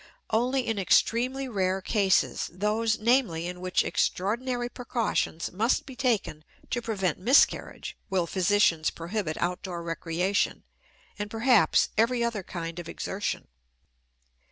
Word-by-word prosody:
Only 250 +3 +1
in 225 -3 -1
extremely 250 +7 +2
rare 190 -5 0
cases 195 -1 +1
those, 215 +4 0
namely, 215 -8 +2
in 180 0 -6
which 185 0 +1
extraordinary 240 +6 -1
precautions 235 -9 -2
must 220 +7 +1
be 265 - -10
taken 230 - -1 0.3
to 240 - 0
prevent 195 -8 -1
miscarriage 245 +9 +2
will 185 -3 +1
physicians 185 -3 +2
prohibit 170 -1 -4
outdoor 180 0 -3
recreation 170 +3 -1 0.6
and, 205 0 -3
perhaps, 225 +1 +3
every 235 +1 +3
other 230 -3 -1
kind 170 -2 -6
of 170 -1 -7
exertion. 200 +2 -4
205 Hz, 120 wpm, -27 LUFS, 180-235 Hz, 0.6 s, perhaps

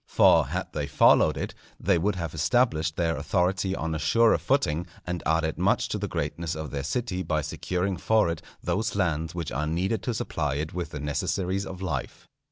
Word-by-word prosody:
For - - +5
had - - -4
they - - -2
followed - - +5
it, - - -4 0.3
they 90 -1 +2
would 100 +3 +1
have 85 -4 -4
established 80 -4 +1
their 80 -1 +1
authority 95 +6 0
on 80 -2 -2
a 80 - -2
surer 115 +10 +4
footing, 90 - +1 0.2
and 90 -1 -3
added 80 0 +1
much - - +2
to - - -2
the - - -2
greatness 80 +3 -3
of 80 -1 -5
their 70 - -2
city 95 - -2
by 80 -3 0
securing 90 +4 -2
for 110 +3 +3
it 85 -1 -3 0.2
those 110 -1 -1
lands 80 -4 0
which 85 -3 -3
are 75 - -1
needed 95 +6 0
to 120 +1 -2
supply 75 -9 -2
it 75 +2 -3
with 85 -2 -3
the 75 - -6
necessaries 95 +6 -1
of 95 0 -7
life. 75 -8 -4
85 Hz, 195 wpm, -27 LUFS, 80-95 Hz, 0.3 s, For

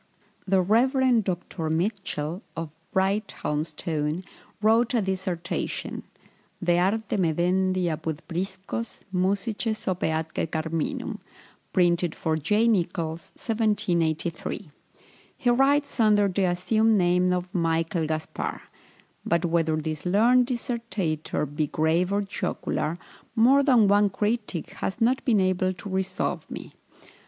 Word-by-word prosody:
The 190 -1 +3
Rev. 245 +3 +3
Dr. 175 -3 -3
Mitchell, 175 -1 -2 0.2
of 165 -2 -4 0.2
Brighthelmstone, 160 -4 -1 0.4
wrote 225 +4 +3
a 230 - +3
dissertation, 185 -2 -3 0.6
"De 175 0 +3
Arte 205 +4 0
Medendi 185 +2 +1
apud 160 -2 -2
Priscos, 190 +6 -4
Musices 205 +4 -1
ope 185 -1 -1
atque 160 +1 -2
Carminum," 160 0 -3 0.5
printed 175 -2 +2
for 160 -1 -1
J. 210 +9 +2
Nichols, 170 -5 -1
1783. 180 - -1 0.7
He 245 - +1
writes 280 +2 +2
under 210 -2 +5
the 195 0 +1
assumed 215 +5 +2
name 180 0 +3
of 180 +1 -2
Michael 165 -2 0
Gaspar; 155 0 -3 0.6
but 170 +1 +1
whether 165 -2 +1
this 155 -1 -3
learned 240 +6 +4
dissertator 230 - -2
be 150 +1 -2
grave 160 +5 +1
or 205 +1 +1
jocular, 170 -4 -2 0.4
more 255 +5 +6
than 250 -7 +5
one 205 +1 +4
critic 210 -3 -2
has 195 - -4
not 250 +3 +2
been 225 -5 +4
able 185 0 +1
to 185 +3 -10
resolve 190 0 -2
me. - - -8
185 Hz, 115 wpm, -26 LUFS, 165-215 Hz, 0.7 s, more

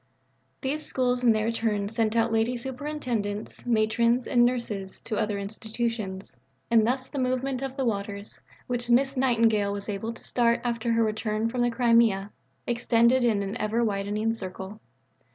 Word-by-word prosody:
These 300 +3 -2
Schools 250 -2 0
in 240 - +6
their 220 +1 +1
turn 215 -3 -1
sent 225 0 0
out 230 0 +2
Lady 225 +3 +1
Superintendents, 250 -6 -4
Matrons, 235 +2 +2
and 245 -3 +3
nurses 230 -6 -1
to 215 - -4
other 210 -1 0
institutions, 215 - -4 0.4
and 225 -1 +5
thus 260 +1 0
the 280 - -5
movement 255 +1 -1
of 270 0 -5
the 265 - 0
waters, 200 -2 -3 0.2
which 245 -1 -2
Miss 265 +3 +3
Nightingale 225 -5 +2
was 200 +1 -5
able 210 +3 -3
to 230 - -11
start 235 -1 +2
after 235 -1 -1
her 230 0 +3
return 215 0 -1
from 245 +1 -2
the 240 - +3
Crimea, 230 -4 +3 0.3
extended 240 +1 +3
in 215 -4 +2
an 195 0 -4
ever 220 +3 0
widening 210 +1 0
circle. 190 0 -7
230 Hz, 160 wpm, -27 LUFS, 215-245 Hz, 0.4 s, in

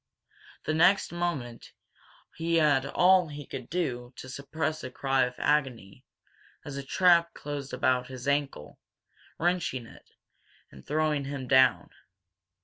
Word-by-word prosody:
The 155 - -1
next 175 +5 +3
moment 160 -9 -4 0.6
he 165 +1 -1
had 145 -4 +3
all 180 +4 +4
he 145 -1 -8
could 130 -2 -8
do 125 -8 -3
to 130 - -10
suppress 155 +4 -4
a 130 - -5
cry 135 0 +1
of 125 0 -6
agony 130 -9 -1 0.6
as 145 - -7
a 140 - -4
trap 170 +4 +3
closed 145 -1 -6
about 125 -1 +1
his 130 0 -8
ankle, 140 - -2 0.6
wrenching 165 -8 -1
it, - - -17 0.6
and 65 - -14
throwing 150 -1 0
him 135 -2 -5
down. 130 -1 +4
140 Hz, 135 wpm, -28 LUFS, 130-160 Hz, 0.6 s, all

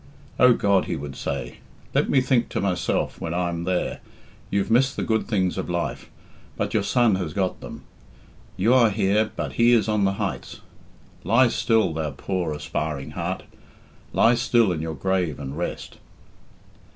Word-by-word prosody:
Oh, 125 -1 +7
God,' 100 -4 +2
he - - -3
would 70 -1 -7
say, 70 -3 -5 0.3
'let - - +2
me 135 - +4
think 125 -2 +1
to - - -2
myself 90 -3 -1
when 85 +1 -3
I'm 85 -1 -2
there, 90 0 -1 0.5
you've 100 +2 -1
missed 130 +3 +3
the - - -2
good 110 -1 0
things 95 -4 0
of - - -4
life, 85 0 -3 0.5
but - - -2
your - - +2
son 115 -6 +2
has 85 -5 -4
got 95 -1 -1
them; - - -9 0.7
you 110 +7 +3
are 120 -3 +5
here, 105 +1 +1
but - - -3
he 120 +1 +4
is 115 -2 +3
on 105 -2 +1
the 95 - +1
heights; 100 -1 -5 0.6
lie 125 +2 +4
still, 115 -7 +1
thou 80 -1 -2
poor 85 +4 -3
aspiring 75 -1 -4
heart, - - -4 0.7
lie 115 - +4
still 120 -3 +2
in 80 -3 -2
your 80 -1 -4
grave 90 -2 -1
and 70 0 -6
rest.'" 85 +2 -5
95 Hz, 170 wpm, -24 LUFS, 85-115 Hz, 0.7 s, Oh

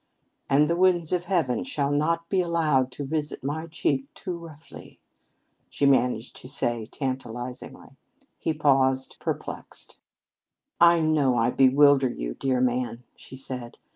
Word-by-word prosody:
"And 145 +2 +4
the 170 - +1
winds 175 -2 +2
of 180 -1 0
heaven 165 -10 0
shall 145 - -2
not 165 +3 0
be 190 0 +1
allowed 155 -7 +1
to 145 - -5
visit 150 0 -3
my 155 +4 -3
cheek 140 -3 -1
too 180 -3 -5
roughly," 165 -2 -13 0.7
she 140 - -1
managed 125 -4 +2
to 125 - -11
say 120 -5 -1
tantalizingly. 125 -2 -6 0.4
He 160 - -1
paused, 135 -3 +2
perplexed. - - -6 0.8
"I 170 -1 +6
know 150 -5 +2
I 115 +1 +2
bewilder 135 0 +5
you, - - -5
dear 130 - -1
man," 125 -1 -1
she - - -13
said. 130 -2 -7
140 Hz, 140 wpm, -25 LUFS, 130-160 Hz, 0.8 s, I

